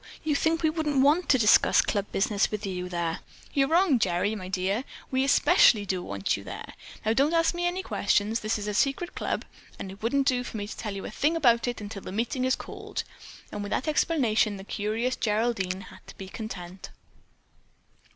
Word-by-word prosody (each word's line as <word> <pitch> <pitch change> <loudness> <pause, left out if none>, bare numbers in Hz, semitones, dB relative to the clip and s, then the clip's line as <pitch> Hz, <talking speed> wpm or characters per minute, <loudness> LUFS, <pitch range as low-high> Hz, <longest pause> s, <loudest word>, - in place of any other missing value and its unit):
You 310 -2 +1
think 320 +3 +1
we 315 - +3
wouldn't 305 -4 0
want 310 +6 +3
to 260 - +6
discuss 215 -3 +5
club 205 -1 -2
business 200 +1 +1
with 210 0 -4
you 180 -2 -4
there. 170 -2 -2 0.3
You're 275 -1 +3
wrong, 330 -5 +3
Gerry, 185 +1 +1
my 190 -4 -6
dear! 190 +5 -1 0.3
We 260 0 +2
especially 225 -5 +5
do 185 -2 -2
want 100 - -1
you 100 - -8
there. 95 - -8 0.3
Now, 220 - +3
don't 285 +7 +2
ask 330 0 +3
me 350 0 -1
any 365 +2 -2
questions. 220 - +1
This 215 +1 -1
is 210 0 -5
a 210 - -2
secret 280 - 0
club - - -3 0.3
and 190 - -6
it 195 - -13
wouldn't 270 +5 +1
do 250 -2 +2
for 230 - -6
me 205 - -3
to - - -7
tell 210 -3 -5
you 195 - -6
a - - -6
thing 295 +9 +1
about 240 -7 +3
it 245 - -2
until 205 -1 -7
the - - -8
meeting 235 +5 -1
is 260 - +2
called." - - -6 0.5
And - - -5
with 205 - -5
that 260 - -1
explanation 240 - +2
the 195 - -9
curious 220 +5 -2
Geraldine 210 -4 -1
had - - -16
to - - -12
be 190 -1 -8
content. 190 -4 -7
220 Hz, 210 wpm, -27 LUFS, 195-275 Hz, 0.5 s, to